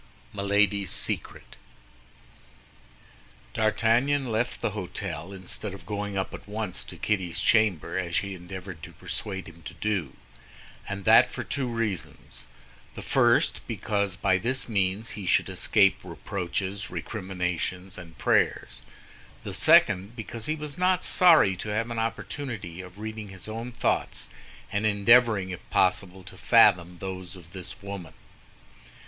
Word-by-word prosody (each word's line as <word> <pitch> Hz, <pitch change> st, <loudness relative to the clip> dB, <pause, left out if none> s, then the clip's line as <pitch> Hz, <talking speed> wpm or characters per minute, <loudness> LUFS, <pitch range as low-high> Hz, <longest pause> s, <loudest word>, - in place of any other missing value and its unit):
MILADY'S 100 Hz, -1 st, +2 dB
SECRET -, -, -2 dB, 2.0 s
D'Artagnan 115 Hz, +5 st, +2 dB
left 120 Hz, +3 st, -1 dB
the -, -, -1 dB
hôtel 95 Hz, -, -5 dB
instead 95 Hz, +1 st, -5 dB
of -, -, -13 dB
going 100 Hz, -1 st, -3 dB
up 95 Hz, -, -2 dB
at -, -, -9 dB
once 105 Hz, -2 st, -3 dB
to -, -, -9 dB
Kitty's 95 Hz, -5 st, 0 dB
chamber, 95 Hz, -6 st, +2 dB
as 85 Hz, -2 st, -3 dB
she 100 Hz, -1 st, 0 dB
endeavored 90 Hz, -1 st, -8 dB
to -, -, -10 dB
persuade 95 Hz, -2 st, -4 dB
him 85 Hz, -1 st, -13 dB
to 80 Hz, -, -9 dB
do—and 100 Hz, +1 st, -6 dB
that -, -, +7 dB
for -, -, -4 dB
two 140 Hz, -3 st, -2 dB
reasons: 115 Hz, -, -3 dB, 0.5 s
the -, -, -7 dB
first, -, -, +3 dB
because 100 Hz, -3 st, -1 dB
by 95 Hz, 0 st, +2 dB
this 125 Hz, +6 st, -1 dB
means 100 Hz, 0 st, 0 dB
he 100 Hz, -3 st, -6 dB
should -, -, +3 dB
escape -, -, +3 dB
reproaches, 95 Hz, +2 st, -4 dB
recriminations, 95 Hz, -2 st, -3 dB
and 85 Hz, -3 st, -12 dB
prayers; -, -, +1 dB, 0.6 s
the -, -, -5 dB
second, 100 Hz, +2 st, +5 dB
because 115 Hz, 0 st, -4 dB
he 155 Hz, -, +1 dB
was 150 Hz, +1 st, -6 dB
not 185 Hz, 0 st, +3 dB
sorry 165 Hz, -, +6 dB
to 105 Hz, -, -5 dB
have 115 Hz, +3 st, -1 dB
an 115 Hz, -, -2 dB
opportunity 115 Hz, -, -4 dB
of 90 Hz, +1 st, -12 dB
reading 110 Hz, 0 st, -6 dB
his 95 Hz, 0 st, -6 dB
own 115 Hz, +3 st, -5 dB
thoughts 120 Hz, -, -1 dB, 0.4 s
and 100 Hz, +2 st, +1 dB
endeavoring, 105 Hz, -1 st, +4 dB
if 90 Hz, -, -5 dB
possible, 95 Hz, 0 st, +1 dB
to -, -, -11 dB
fathom 90 Hz, 0 st, +5 dB
those 95 Hz, 0 st, -5 dB
of 85 Hz, -2 st, -14 dB
this 95 Hz, +1 st, -7 dB
woman. 100 Hz, -5 st, -7 dB
100 Hz, 135 wpm, -27 LUFS, 95-110 Hz, 2.0 s, that